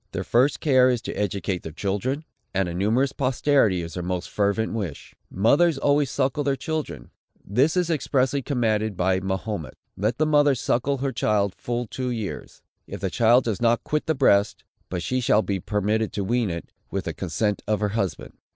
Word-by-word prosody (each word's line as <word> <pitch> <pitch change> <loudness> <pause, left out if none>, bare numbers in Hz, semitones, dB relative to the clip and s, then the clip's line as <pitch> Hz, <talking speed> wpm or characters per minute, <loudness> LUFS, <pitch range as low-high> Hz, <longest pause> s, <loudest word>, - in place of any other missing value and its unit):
Their 95 -1 -2
first 125 +8 +2
care 130 -4 +5
is 125 -2 +1
to - - -4
educate 100 -2 -2
their 80 - -7
children; 105 - -2 0.3
and 95 -1 +1
a 85 - -4
numerous 110 +9 +1
posterity 130 -8 +2
is 85 - -7
their 90 - -4
most 90 0 -3
fervent 105 +2 0
wish. 95 -10 -5 0.2
Mothers 140 - +3
always 145 0 +2
suckle 135 +3 0
their 140 -1 +1
children. 155 +2 -5 0.3
This 135 - +2
is 175 -2 +1
expressly 140 -2 +1
commanded 110 - 0
by 95 +1 +2
Mahomet: 95 -6 -4 0.2
"Let 110 +5 -1
the 155 - +2
mother 145 -2 +4
suckle 130 +3 0
her 135 +1 -2
child 105 -4 +1
full 120 0 -3
two 125 +3 -4
years, 110 -5 -5 0.2
if 100 - -7
the 95 -1 -2
child 120 +4 +4
does 110 -3 -2
not 120 0 +2
quit 150 0 -2
the 160 - +1
breast; 105 -6 +3 0.3
but 90 -2 -3
she 130 0 -1
shall 110 -2 +3
be 100 -2 -2
permitted 105 +3 -1
to 100 - -2
wean 115 +1 0
it, 85 -1 -6 0.2
with - - -3
the - - -3
consent 105 -2 -1
of 105 -1 +1
her 105 -1 0
husband." 100 -6 -3
110 Hz, 190 wpm, -24 LUFS, 100-135 Hz, 0.3 s, care